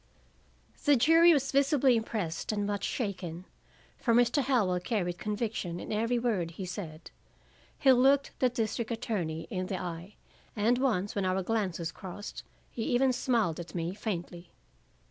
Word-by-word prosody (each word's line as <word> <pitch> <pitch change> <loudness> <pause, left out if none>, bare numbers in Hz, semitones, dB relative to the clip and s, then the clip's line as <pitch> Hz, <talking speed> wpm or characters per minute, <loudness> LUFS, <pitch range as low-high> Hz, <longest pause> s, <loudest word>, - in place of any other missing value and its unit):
The 290 -2 +5
jury 325 +7 +6
was 275 -4 +2
visibly 275 -2 +4
impressed 215 -8 -2
and 205 -1 -1
much 205 -1 -2
shaken. 185 -6 -4 0.5
For 230 -2 +2
Mr. 245 +4 +4
Howell 225 -10 +2
carried 180 -3 -2
conviction 210 -5 -3
in - - -7
every 230 +3 +1
word 220 -8 0
he 180 +3 -7
said; 170 -4 -7 0.7
he 270 - +5
looked 270 +2 +4
the 255 - +3
district 230 -2 -2
attorney 195 -9 -2
in 185 -1 -2
the 185 -1 -3
eye, 175 +3 -6 0.4
and 230 +3 +2
once 210 -7 0
when 200 - -1
our 185 0 0
glances 185 -6 -1
crossed 190 +4 -8 0.3
he 235 - -5
even 255 +3 +2
smiled 230 -10 0
at 170 +1 -8
me 170 +1 -2
faintly. 175 -4 -5
210 Hz, 150 wpm, -30 LUFS, 180-245 Hz, 0.7 s, jury